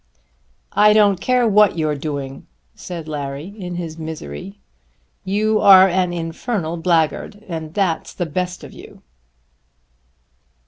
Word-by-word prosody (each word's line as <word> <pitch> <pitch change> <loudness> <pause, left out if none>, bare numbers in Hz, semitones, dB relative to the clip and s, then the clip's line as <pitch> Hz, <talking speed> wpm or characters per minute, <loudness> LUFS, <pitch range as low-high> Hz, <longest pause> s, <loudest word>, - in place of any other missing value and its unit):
"I 210 0 +5
don't 205 -3 +4
care 250 -2 +2
what 210 -4 +4
you're 155 -2 0
doing," 140 -2 -5 0.3
said 170 -3 -8
Larry 145 -1 -5
in 180 -2 -5
his 165 -2 -6
misery. 100 - -7 0.6
"You 215 +3 +1
are 190 -2 +8
an 180 -1 0
infernal 170 +1 -3
blackguard 170 +5 0
and 160 -2 -6
that's 185 -6 -1
the 175 - -2
best 180 +3 -4
of - - -11
you." - - -14
175 Hz, 125 wpm, -20 LUFS, 155-195 Hz, 0.6 s, are